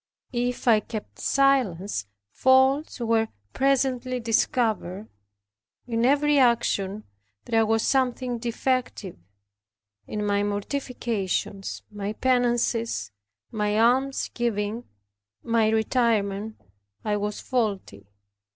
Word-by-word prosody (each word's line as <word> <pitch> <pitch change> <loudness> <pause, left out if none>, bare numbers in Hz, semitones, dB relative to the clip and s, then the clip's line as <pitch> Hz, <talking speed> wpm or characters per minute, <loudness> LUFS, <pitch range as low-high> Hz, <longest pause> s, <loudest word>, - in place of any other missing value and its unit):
If 245 +1 -2
I 225 -2 +6
kept 215 0 -8
silence, 205 - +1 0.2
faults 265 - +3
were 225 -1 +1 0.3
presently 260 -2 +1
discovered 220 -4 0 0.8
in 230 -1 0
every 290 +1 +3
action 215 -5 +1 0.4
there 225 -1 +2
was 225 0 +2
something 255 -2 0
defective 240 -4 -2 0.9
in 210 0 -3
my 205 0 +1
mortifications, 205 -2 -3
my 205 0 -4
penances, 235 - 0 0.4
my 210 -1 0
alms 260 +4 +2
giving, 225 -1 -2 0.6
my 230 -2 +2
retirement, 220 -2 0 0.5
I 210 -1 +1
was 205 0 -3
faulty. 200 - -2
230 Hz, 90 wpm, -25 LUFS, 210-255 Hz, 0.9 s, I